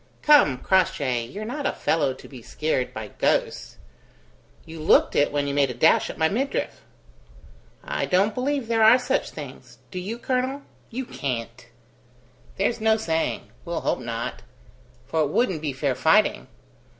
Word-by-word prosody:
"Come, 290 - +6
Crossjay, 135 -10 +1
you're 205 - -7
not 280 +5 -3
a - - +1
fellow 145 -4 +1
to - - -13
be 130 -4 -11
scared 130 +1 -2
by - - -7
ghosts? - - 0 0.9
You 160 0 -10
looked 155 - +3
it 145 - +3
when 145 0 0
you 140 - -2
made 140 -1 +2
a 125 - -5
dash 160 +7 +4
at - - -7
my 160 - +3
midriff." 260 +11 -2 1.0
"I - - -2
don't 195 +3 +2
believe 270 0 -1
there 225 -1 +1
are 220 +3 +8
such 255 +1 -1
things. - - -10
Do 185 - -4
you, 205 +6 -5
colonel? 260 +3 -2 0.3
You 255 +3 -4
can't!" 120 - -5 0.9
"There's 215 +4 0
no 220 0 +3
saying. 165 -7 -2
We'll 170 -1 -4
hope - - 0
not; 115 -1 -5 0.6
for 160 +4 -1
it 150 - +1
wouldn't 185 - 0
be 150 -2 -2
fair 135 0 -1
fighting. 125 - +2
165 Hz, 160 wpm, -24 LUFS, 140-235 Hz, 1.0 s, are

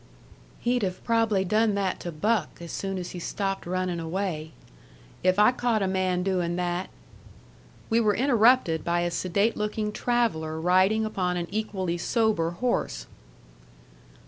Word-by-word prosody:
"He'd 245 +1 +1
have 185 -2 -3
prob'ly 225 -4 +2
done 215 +2 +2
that 195 -2 -1
to 175 - -5
Buck 200 +2 -1
as 170 -1 -8
soon 195 -1 -3
as 180 -1 -5
he 180 - -6
stopped 195 +1 -3
runnin' 185 -1 -1
away. 165 -2 -3 0.7
If 185 +1 +2
I 210 +3 +6
caught 240 -4 0
a - - +1
man 185 -1 0
doin' 180 -3 0
that 180 +1 -2 0.5
" - - -26
We 225 - +4
were 210 -3 +2
interrupted 235 - +3
by 175 0 +1
a 175 0 -1
sedate 200 +6 0
looking 210 0 -2
traveller 210 -11 0
riding 185 +6 +3
upon 180 -4 -1
an 175 - -2
equally 190 -5 -2
sober 215 -5 +1
horse. 240 +8 -2
190 Hz, 150 wpm, -26 LUFS, 175-220 Hz, 0.7 s, I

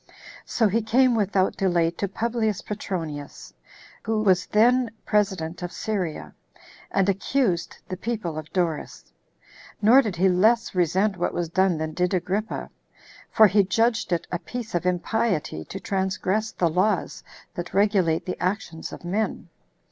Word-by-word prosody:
So 225 - +2
he 220 +4 +1
came 245 +4 +3
without 200 -3 +1
delay 175 -3 +2
to 200 +4 -3
Publius 220 0 -1
Petronius, 165 -9 -6 0.5
who 220 -1 -1
was 185 -3 +3
then 245 +3 +3 0.2
president 190 -5 0
of 175 0 -4
Syria, 190 -7 -3 0.6
and 195 -1 +1
accused 195 -1 0
the 185 - -4
people 210 -6 -3
of 155 0 -7
Doris. 170 -5 -3 0.7
Nor 230 +6 +7
did 210 -8 -3
he 185 +3 +3
less 215 +6 +3
resent 185 +3 +1
what 175 - -1
was 175 -2 -2
done 185 0 +2
than 155 0 -3
did 180 +3 0
Agrippa; 195 +5 -2 0.6
for 220 - +6
he 205 0 +4
judged 225 +3 +1
it 175 - 0
a 175 - -1
piece 245 +2 -7
of 175 0 0
impiety 180 - -1
to - - -7
transgress 195 +2 -1
the 175 - +1
laws 185 +3 0 0.3
that 175 -1 -6
regulate 195 -5 +2
the 180 - -5
actions 180 -3 -3
of - - -10
men. 195 -1 -2
190 Hz, 150 wpm, -24 LUFS, 175-215 Hz, 0.7 s, Nor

